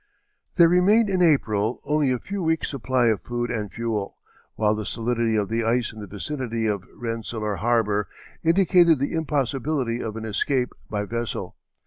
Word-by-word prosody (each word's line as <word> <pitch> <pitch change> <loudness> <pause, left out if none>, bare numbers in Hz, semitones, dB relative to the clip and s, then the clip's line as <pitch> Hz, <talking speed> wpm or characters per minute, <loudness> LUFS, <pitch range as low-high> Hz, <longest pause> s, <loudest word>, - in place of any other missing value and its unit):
There 170 -3 +7
remained 200 +5 +4
in 185 -1 +1
April 115 - +2
only 150 -1 +2
a 125 - +1
few 195 +10 -5
weeks' 160 -1 0
supply 130 -2 0
of 110 -3 0
food 120 0 -3
and 105 -4 -3
fuel, 110 -3 -3 0.4
while 105 -1 +2
the 110 0 -3
solidity 115 +1 -1
of 105 -2 +1
the 115 +2 -1
ice 115 0 0
in 110 - -11
the 105 - -7
vicinity 115 - -3
of 100 -4 -1
Rensselaer 115 -3 -3
Harbor 110 -3 +1 0.4
indicated 170 -1 +5
the 140 +2 -2
impossibility 140 -4 -1
of 110 -1 -4
an 110 0 -5
escape 125 +4 0 0.2
by 105 -1 -2
vessel. 115 +2 -4
120 Hz, 165 wpm, -24 LUFS, 110-150 Hz, 0.4 s, There